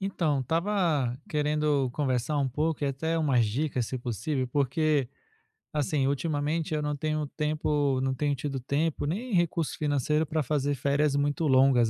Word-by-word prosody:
Então, 165 -8 0
estava 160 - 0
querendo 150 -3 +1
conversar 135 +1 0
um 140 -2 +1
pouco 150 +3 -1
e - - +1
até 140 +4 -1
pedir - - +1
umas 135 -7 +3
dicas, 125 +1 -1
se 130 - -3
possível, 130 +3 -2
porque, 140 +1 +1 0.7
assim, 145 -2 +1
ultimamente 150 +2 -1
eu 155 - 0
não 150 0 -1
tenho 155 +1 -1
tempo 150 -2 0
não 130 0 0
tenho 145 +2 0
tido 135 0 -3
tempo, 145 +5 -1
nem 210 +11 -3
recurso 170 -3 +1
financeiro 150 +1 +1
para 155 +1 -1
fazer 145 0 0
férias 140 +2 +1
muito 145 +2 +1
longas, 130 -3 +5
145 Hz, 160 wpm, -28 LUFS, 135-155 Hz, 0.7 s, longas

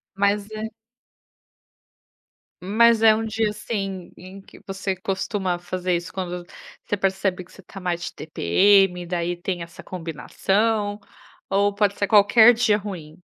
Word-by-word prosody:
Mas 200 +1 0
é 215 +1 -4 2.0
mas 225 +3 +4
é 220 -1 +8
um 225 +1 -1
dia 220 0 0
assim, 195 -4 -5
em 190 +2 -11
que - - -17
você 195 0 -3
costuma 190 -1 -2
fazer 180 0 -2
isso 170 -1 -6
quando 180 -2 -5 0.4
você 205 - -1
percebe 190 -1 -1
que - - -23
você - - -15
está 195 +1 -12
mais 175 -1 -2
de - - -5
tpm, 180 - +3
daí 175 0 -2
tem 175 0 -4
essa 170 - -13
combinação, 205 +5 -1 0.5
ou 200 +1 +2
pode 200 -1 +1
ser 200 - +1
qualquer 220 +3 +6
dia 220 -3 +2
ruim? 180 -5 -8
195 Hz, 145 wpm, -23 LUFS, 180-210 Hz, 2.0 s, é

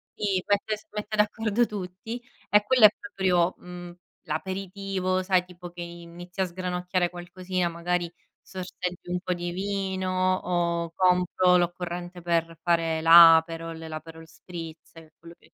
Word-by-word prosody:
i 195 -3 -1
mette 205 +1 +1
s 210 - -17
mette 210 +1 -4
d'accordo 215 +2 +1
tutti 205 +4 -6 0.3
e 210 0 +4
quello 255 -3 +3
è - - +11
proprio, 185 -5 +1
mhmm, 175 -1 -9 0.3
l'aperitivo, 185 +2 -2
sai 185 -1 +2
tipo 175 -1 -11
che 175 0 -9
inizi 175 +2 -8
a - - +3
sgranocchiare 180 0 -2
qualcosina, 180 0 -3
magari 170 0 -2 0.3
sorseggi 180 -1 -6
un 180 0 -2
po' 185 - -3
di 175 0 -4
vino 190 -1 -1
o 170 -2 -1
compro 180 0 +3
l'occorrente 175 0 -2
per 165 -1 -1
fare 165 -2 +1
l'aperol, 165 0 +6
l'aperol 160 0 -9
spritz 165 -1 -10
e 160 -1 -15
quello 170 0 -13
che - - -25
180 Hz, 140 wpm, -26 LUFS, 170-190 Hz, 0.3 s, è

